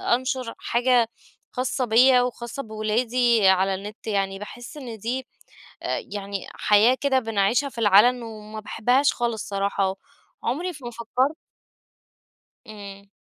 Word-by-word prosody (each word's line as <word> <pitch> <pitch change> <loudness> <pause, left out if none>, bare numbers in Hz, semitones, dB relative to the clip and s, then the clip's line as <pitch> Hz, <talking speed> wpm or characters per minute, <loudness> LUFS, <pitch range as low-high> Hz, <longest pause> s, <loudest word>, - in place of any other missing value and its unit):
أنشر 255 -1 -3
حاجة 240 -1 +2 0.4
خاصة 255 +1 -1
بيَّ 250 +3 +6
وخاصة 245 +1 -4
بولادي 225 0 +1
على 190 +1 +3
النت. 210 +4 -9
يعني 195 -2 -1
باحِس 240 +7 -9
إن 245 -6 -7
دي 255 +5 -3 0.6
آآ، - - -2
يعني 200 -2 -5
حياة 215 +5 +4
كده 275 -2 +2
بنعيشها 225 +3 +1
في 255 - -13
العلن، 230 +4 +5
وما 215 -1 -8
باحبهاش 250 +6 +2
خالص 235 -3 -2
صراحة، 195 -1 -1 0.5
وعمري 310 +10 -1
ما 240 - -5
فكَّرت 245 +5 -1 1.3
إمم، 200 -2 -10
230 Hz, 120 wpm, -24 LUFS, 205-250 Hz, 1.3 s, بيَّ